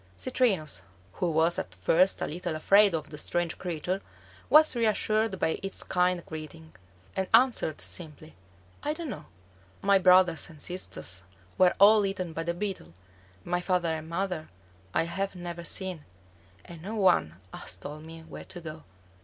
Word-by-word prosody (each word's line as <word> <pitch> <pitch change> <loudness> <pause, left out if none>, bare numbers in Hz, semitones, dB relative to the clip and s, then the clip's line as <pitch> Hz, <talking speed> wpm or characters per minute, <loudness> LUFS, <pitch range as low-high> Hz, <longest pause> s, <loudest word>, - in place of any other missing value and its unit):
Citrinus, 155 - +1 0.3
who 180 - -1
was 165 +2 +2
at 95 - -6
first 165 - +3
a - - +1
little 175 +1 -4
afraid 200 +4 +5
of 155 - -5
the 150 - -7
strange 175 +1 -2
creature, 180 +2 -3 0.5
was 310 -2 +6
reassured 215 -2 +1
by 160 - 0
its 195 0 -2
kind 180 -1 +1
greeting, 160 0 -9 0.4
and 190 -1 -1
answered 235 - +3
simply, 155 -2 -5 0.5
"I 295 - -1
don't 320 -3 -5
know. - - -8 0.6
My 200 0 +5
brothers 180 -3 +5
and 155 -3 -14
sisters 145 - -3 0.3
were 185 -1 +4
all 210 +1 +7
eaten 185 -4 -3
by 165 - -3
the 170 +1 -2
Beetle; 180 - -5 0.5
my 175 0 -1
father 180 -2 +1
and 160 0 -6
mother 175 -2 -3 0.4
I - - +2
have 190 +4 -3
never 175 -1 -6
seen; 180 -2 -3 0.6
and 170 -2 -11
no 205 +6 -5
one 180 - +3 0.2
has 90 - -5
told 150 +9 -8
me 165 0 -10
where 160 - -10
to 175 - -7
go." 160 -2 -9
175 Hz, 160 wpm, -28 LUFS, 160-195 Hz, 0.6 s, all